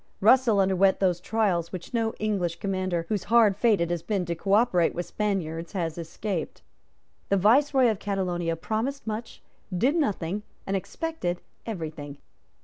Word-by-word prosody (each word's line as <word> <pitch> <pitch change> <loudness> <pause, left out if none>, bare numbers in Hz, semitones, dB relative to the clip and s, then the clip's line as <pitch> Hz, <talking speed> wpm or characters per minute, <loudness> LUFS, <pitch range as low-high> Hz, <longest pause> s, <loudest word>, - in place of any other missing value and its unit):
Russell 230 0 +5
underwent 190 0 +3
those 180 -3 +2
trials 185 -5 0
which 185 +4 -8
no 225 -1 +1
English 195 -6 -1
commander 185 -2 -2
whose 210 -3 -1
hard 225 -2 +5
fate 215 0 +3
it 170 0 0
has 175 -2 -1
been 195 -1 -1
to 170 - -2
cooperate 195 0 +2
with 175 - -3
Spaniards 170 -5 -2
has 165 -5 -2
escaped. 170 +1 -4 0.7
The 200 - +3
Viceroy 260 +6 +4
of 215 -4 0
Catalonia 180 -4 -1
promised 225 - -3
much, 220 +1 -5 0.3
did 245 - +2
nothing, 205 - -1 0.2
and 195 - -1
expected 195 - -3 0.3
every 170 -8 -4
thing. 145 -2 -9
195 Hz, 150 wpm, -26 LUFS, 175-220 Hz, 0.7 s, Russell